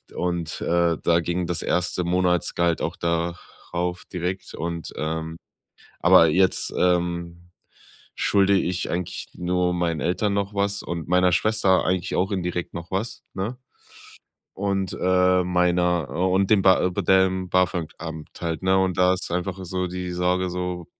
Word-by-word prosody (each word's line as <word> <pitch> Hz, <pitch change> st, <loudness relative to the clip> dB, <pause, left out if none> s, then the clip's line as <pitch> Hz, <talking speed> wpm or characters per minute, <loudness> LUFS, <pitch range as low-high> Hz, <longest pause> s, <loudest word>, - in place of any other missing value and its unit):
Und, 85 Hz, -2 st, -3 dB
äh, 85 Hz, 0 st, +2 dB
da 85 Hz, 0 st, +3 dB
ging 85 Hz, +2 st, -2 dB
das 85 Hz, -1 st, -2 dB
erste 90 Hz, 0 st, 0 dB
Monatsgehalt 90 Hz, -1 st, +1 dB
auch 85 Hz, -, -2 dB
da 85 Hz, +1 st, -1 dB, 0.4 s
rauf 90 Hz, +1 st, -2 dB
direkt 90 Hz, +1 st, -4 dB
und, 85 Hz, 0 st, -5 dB
ähm 80 Hz, +1 st, -3 dB, 0.6 s
aber 85 Hz, -, +7 dB
jetzt, 95 Hz, +4 st, +2 dB
ähm, 85 Hz, -1 st, 0 dB, 0.7 s
schulde 100 Hz, -1 st, +3 dB
ich 90 Hz, 0 st, -2 dB
eigentlich 85 Hz, 0 st, -4 dB
nur 90 Hz, 0 st, 0 dB
meinen 85 Hz, -3 st, -1 dB
Eltern 100 Hz, +3 st, 0 dB
noch 100 Hz, 0 st, -2 dB
was 100 Hz, 0 st, 0 dB
und 85 Hz, -2 st, -5 dB
meiner 90 Hz, 0 st, +3 dB
Schwester 105 Hz, -2 st, +2 dB
eigentlich 90 Hz, -1 st, -1 dB
auch 95 Hz, +3 st, +1 dB
indirekt 90 Hz, -2 st, -3 dB
noch 85 Hz, -1 st, -7 dB
was, 100 Hz, +5 st, -3 dB
ne? 100 Hz, +6 st, -3 dB, 1.0 s
Und, 95 Hz, -1 st, -1 dB
äh, 90 Hz, 0 st, +3 dB
meiner, 90 Hz, -2 st, +1 dB
äh -, -, -6 dB
und 95 Hz, +1 st, +2 dB
dem 105 Hz, -3 st, +5 dB
ba 95 Hz, -1 st, +5 dB
de 90 Hz, -, +1 dB
be 100 Hz, +3 st, -2 dB
dem 95 Hz, 0 st, +3 dB
BAföG-Amt 85 Hz, -3 st, -2 dB
halt, 85 Hz, 0 st, -3 dB
ne? 95 Hz, 0 st, +3 dB
Und 95 Hz, -1 st, 0 dB
da 90 Hz, 0 st, +4 dB
ist 95 Hz, -, -6 dB
einfach 90 Hz, +2 st, -2 dB
so 90 Hz, +1 st, -2 dB
die 90 Hz, 0 st, -5 dB
Sorge 90 Hz, +1 st, 0 dB
so, 90 Hz, -1 st, -4 dB
90 Hz, 155 wpm, -24 LUFS, 85-95 Hz, 1.0 s, aber